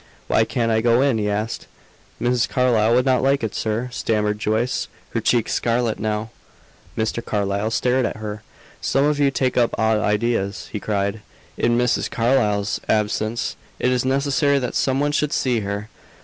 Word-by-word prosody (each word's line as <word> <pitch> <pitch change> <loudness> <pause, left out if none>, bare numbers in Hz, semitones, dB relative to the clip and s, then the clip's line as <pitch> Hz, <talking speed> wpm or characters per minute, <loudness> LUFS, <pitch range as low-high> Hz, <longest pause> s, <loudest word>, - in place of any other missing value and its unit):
"Why 110 - +3
can't 115 -1 0
I 110 0 +2
go 120 +2 +3
in?" 135 -5 +2
he 105 -1 0
asked. 105 +3 -3 0.5
"Mrs. 120 0 +1
Carlyle 120 -3 +3
would 125 +1 +3
not 130 -2 +3
like 135 -1 +2
it, 110 - -2
sir," 110 +3 -2
stammered 105 -3 -1
Joyce, 115 +4 0 0.2
her - - -1
cheeks 120 -3 +1
scarlet 115 -1 0
now. 110 +1 -2 0.7
Mr. 110 +1 -1
Carlyle 100 0 -1
stared 125 +3 +1
at - - -6
her. 105 0 -6 0.4
"Some 135 +1 +2
of 150 0 +1
you 140 -1 +4
take 130 -2 -1
up 120 -2 +2
odd 110 -1 +2
ideas," 105 -2 -1
he 105 - -3
cried. 100 0 -2 0.3
"In 120 0 +1
Mrs. 125 0 +1
Carlyle's 105 -4 +1
absence, 110 +2 0 0.2
it 125 - +1
is 125 -1 +1
necessary 140 +2 +2
that 125 -3 -2
some 135 0 +1
one 145 +1 +1
should 150 0 0
see 125 -3 +1
her! 100 0 -4
115 Hz, 175 wpm, -22 LUFS, 105-125 Hz, 0.7 s, you